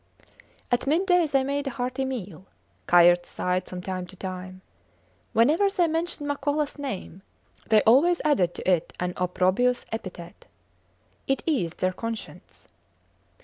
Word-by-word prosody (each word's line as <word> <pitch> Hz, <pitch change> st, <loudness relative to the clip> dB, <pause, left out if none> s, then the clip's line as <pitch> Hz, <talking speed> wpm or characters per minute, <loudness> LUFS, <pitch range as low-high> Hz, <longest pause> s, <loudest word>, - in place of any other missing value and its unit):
At 245 Hz, +2 st, +1 dB
midday 355 Hz, +2 st, +3 dB
they 275 Hz, -2 st, +2 dB
made 280 Hz, +1 st, -2 dB
a -, -, +1 dB
hearty 255 Hz, +1 st, -3 dB
meal. 195 Hz, -8 st, -6 dB, 0.4 s
Kayerts 175 Hz, 0 st, +5 dB
sighed 180 Hz, 0 st, -2 dB
from 180 Hz, -1 st, -7 dB
time 185 Hz, -1 st, -4 dB
to 190 Hz, -, -14 dB
time. 185 Hz, 0 st, -7 dB, 0.7 s
Whenever 310 Hz, -, +3 dB
they 375 Hz, -3 st, +2 dB
mentioned 325 Hz, -2 st, -2 dB
Makolas 290 Hz, +1 st, -1 dB
name 200 Hz, -, -6 dB, 0.5 s
they 215 Hz, -1 st, +5 dB
always 310 Hz, +10 st, +5 dB
added 190 Hz, -, +2 dB
to -, -, -6 dB
it 180 Hz, -3 st, +1 dB
an 180 Hz, 0 st, -2 dB
opprobrious 185 Hz, +7 st, +1 dB
epithet. 185 Hz, -6 st, -8 dB, 0.8 s
It 270 Hz, -1 st, 0 dB
eased 190 Hz, -, -1 dB
their 185 Hz, 0 st, +1 dB
conscience. 230 Hz, +3 st, -7 dB
230 Hz, 135 wpm, -26 LUFS, 185-285 Hz, 0.8 s, Kayerts